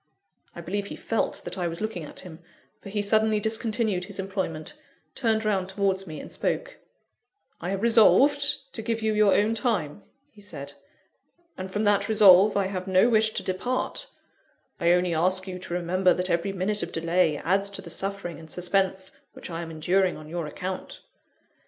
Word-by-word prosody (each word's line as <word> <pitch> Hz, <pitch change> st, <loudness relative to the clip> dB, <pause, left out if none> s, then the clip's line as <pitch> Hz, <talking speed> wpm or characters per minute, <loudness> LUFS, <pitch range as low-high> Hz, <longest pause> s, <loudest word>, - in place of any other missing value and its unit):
I 170 Hz, -, -7 dB
believe 200 Hz, +4 st, -3 dB
he -, -, -6 dB
felt 225 Hz, -, -2 dB
that -, -, -6 dB
I 175 Hz, -, 0 dB
was 165 Hz, 0 st, -4 dB
looking 215 Hz, -6 st, -3 dB
at 150 Hz, -, -7 dB
him; 170 Hz, -3 st, -11 dB, 0.4 s
for -, -, -9 dB
he 205 Hz, +1 st, -1 dB
suddenly 215 Hz, +1 st, +3 dB
discontinued 220 Hz, -3 st, -1 dB
his 200 Hz, 0 st, -6 dB
employment, 190 Hz, -, -4 dB, 0.4 s
turned 225 Hz, -4 st, 0 dB
round 190 Hz, -3 st, 0 dB
towards 195 Hz, -1 st, 0 dB
me, 155 Hz, -2 st, -7 dB
and -, -, -9 dB
spoke -, -, -2 dB, 0.8 s
"I 175 Hz, -, -3 dB
have 195 Hz, +2 st, -2 dB
resolved 275 Hz, +5 st, +4 dB
to 225 Hz, -, -4 dB
give 225 Hz, 0 st, -2 dB
you 220 Hz, 0 st, +1 dB
your 210 Hz, -2 st, +4 dB
own 210 Hz, +2 st, +2 dB
time," 205 Hz, -, -1 dB, 0.3 s
he 210 Hz, -, -17 dB
said, 205 Hz, -, -8 dB, 0.8 s
"and 185 Hz, 0 st, -6 dB
from 210 Hz, +3 st, -2 dB
that 205 Hz, 0 st, +2 dB
resolve 205 Hz, -1 st, +7 dB
I 200 Hz, -, +2 dB
have 185 Hz, -1 st, -4 dB
no 190 Hz, +5 st, +4 dB
wish 220 Hz, -1 st, +4 dB
to -, -, -1 dB
depart 250 Hz, -, -2 dB, 0.7 s
I 170 Hz, -1 st, +3 dB
only 180 Hz, -1 st, +1 dB
ask 185 Hz, +4 st, +1 dB
you 185 Hz, -1 st, -5 dB
to 180 Hz, -, -7 dB
remember 180 Hz, +1 st, +2 dB
that 180 Hz, 0 st, -2 dB
every 170 Hz, +3 st, 0 dB
minute 195 Hz, +2 st, -1 dB
of 170 Hz, -, -4 dB
delay 165 Hz, -1 st, +1 dB
adds 195 Hz, +6 st, 0 dB
to 200 Hz, -, -5 dB
the -, -, -7 dB
suffering 195 Hz, -4 st, -3 dB
and 160 Hz, -1 st, -12 dB
suspense 190 Hz, +2 st, 0 dB, 0.2 s
which -, -, -9 dB
I 165 Hz, 0 st, -4 dB
am 165 Hz, -, -6 dB
enduring 175 Hz, +4 st, +1 dB
on 155 Hz, -, -11 dB
your 165 Hz, 0 st, -4 dB
account." 185 Hz, +5 st, -6 dB
195 Hz, 185 wpm, -26 LUFS, 180-215 Hz, 0.8 s, resolve